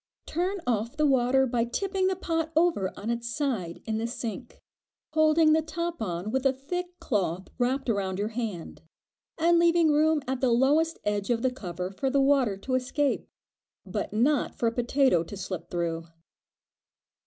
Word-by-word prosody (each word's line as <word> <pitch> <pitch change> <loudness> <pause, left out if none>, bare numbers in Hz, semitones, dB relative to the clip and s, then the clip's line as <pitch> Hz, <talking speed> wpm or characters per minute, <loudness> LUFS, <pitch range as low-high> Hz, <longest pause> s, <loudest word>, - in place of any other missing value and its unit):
Turn 365 +4 -2
off 235 +2 -1
the 305 - +3
water 265 -1 +3
by 240 -2 0
tipping 380 - -1
the 380 - +1
pot 325 -3 -2
over 320 - +2
on 215 +3 -3
its 235 0 -3
side 235 - -2
in 220 -1 -1
the 230 - -1
sink, 235 0 -6 0.5
holding 310 0 +5
the 320 - +4
top 335 +1 -4
on 180 0 -3
with 265 +1 0
a 270 - +4
thick 355 +7 -5
cloth 190 - -1
wrapped 260 +3 0
about 195 -4 -1
your 205 +2 -1
hand, 215 -10 -5 0.6
and 335 +1 +4
leaving 335 -2 +4
room 305 0 +3
at 260 -1 -2
the 260 - +3
lowest 290 +7 +3
edge 205 0 -1
of 235 0 +1
the 260 - +2
cover 180 -6 -5
for 265 +8 -2
the 275 +1 +2
water 270 -7 +3
to 255 +6 -5
escape, 265 +3 0 0.6
but - - -3
not 255 +7 +1
for - - -2
a 230 - +3
potato 245 - +2
to 200 +4 -9
slip 185 -2 -5
through. 165 -1 -2
255 Hz, 175 wpm, -27 LUFS, 215-310 Hz, 0.6 s, holding